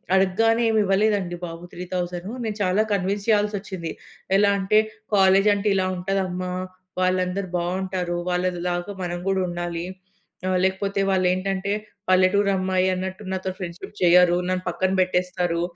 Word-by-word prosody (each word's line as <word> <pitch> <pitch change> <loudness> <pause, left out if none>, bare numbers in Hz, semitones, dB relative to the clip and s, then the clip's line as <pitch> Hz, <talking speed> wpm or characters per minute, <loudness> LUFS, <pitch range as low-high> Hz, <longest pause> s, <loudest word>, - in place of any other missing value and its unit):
అడగగానే 225 +5 +3
ఏం 220 - +2
ఇవ్వలేదండి 195 -2 +1
బాబు. 165 0 -8
3,000 180 0 -4 0.2
నేను 215 -1 -3
చాలా 185 +2 +2
కన్విన్స్ 200 +2 -1
చేయాల్సొచ్చింది. 205 -5 0 0.5
ఎలా 205 0 +4
అంటే 195 +2 +4 0.4
"కాలేజీ 195 +1 +5
అంటే 200 +1 -2
ఇలా 190 -1 +2
ఉంటది 195 +2 -1
అమ్మ. 180 0 -4 0.6
వాళ్ళందరూ 185 +1 0
బావుంటారు. 180 0 -2
వాళ్ళలాగా 180 +1 -1
మనం 175 0 -3
కూడా 190 -1 +1
ఉండాలి. 175 -1 -4 0.6
ఆహ్, 185 0 +2
లేకపోతే 195 +1 0
వాళ్ళేంటంటే 190 +1 +1 0.4
పల్లెటూరమ్మాయి 185 0 +3
అన్నట్టు 190 +2 -4
నాతో 190 0 -2
ఫ్రెండ్‌షిప్ 180 +1 -7
చెయ్యరు. 175 0 +6
నన్ను 185 0 -1
పక్కన 185 +2 0
పెట్టేస్తారు. 180 -2 0
185 Hz, 125 wpm, -24 LUFS, 180-195 Hz, 0.6 s, చెయ్యరు